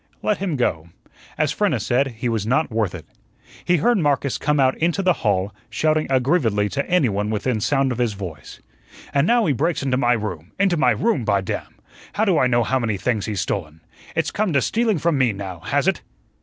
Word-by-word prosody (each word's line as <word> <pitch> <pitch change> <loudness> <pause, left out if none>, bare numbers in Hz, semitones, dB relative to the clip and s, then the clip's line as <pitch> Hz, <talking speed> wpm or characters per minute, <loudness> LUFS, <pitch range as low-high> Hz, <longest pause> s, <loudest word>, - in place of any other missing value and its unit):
Let 210 - +1
him 185 -5 -2
go. 85 - -1 0.5
As - - +1
Frenna - - +1
said, 135 +3 +1
he 115 +2 -4
was 110 -3 -1
not 135 +4 +1
worth 110 -5 -1
it. 80 - -9 0.6
He 175 - +2
heard 235 +7 +2
Marcus 140 -5 0
come 150 0 +1
out 130 -1 +3
into 175 +4 +1
the 180 -1 +4
hall, 100 -1 0 0.2
shouting 155 0 +1
aggrievedly 125 - +2
to 140 - -3
anyone 110 - +1
within 110 +1 -1
sound 135 +2 +1
of 125 - -4
his 120 -3 +1
voice: 90 -8 -9 0.5
"An' 140 +3 +2
now 235 -1 +3
he 150 - +2
breaks 160 +4 -1
into 130 -2 +1
my 120 -2 +3
room 95 -7 -5
into 195 -3 +3
my 130 -6 +3
room, 125 - +1
by 100 -3 +1
damn! 95 - -5 0.4
How 220 - +1
do 185 -6 +3
I 130 - +4
know 120 -1 +2
how 130 +4 0
many 110 -4 -1
things 110 0 -1
he's 105 -4 -2
stolen? 80 -5 -4 0.4
It's - - 0
come 205 -5 -1
to 140 - +3
stealing 225 -3 +1
from 160 -2 +1
me, 125 -4 +3
now, 95 -3 -7
has - - -1
it?" - - +1
125 Hz, 210 wpm, -22 LUFS, 105-155 Hz, 0.6 s, the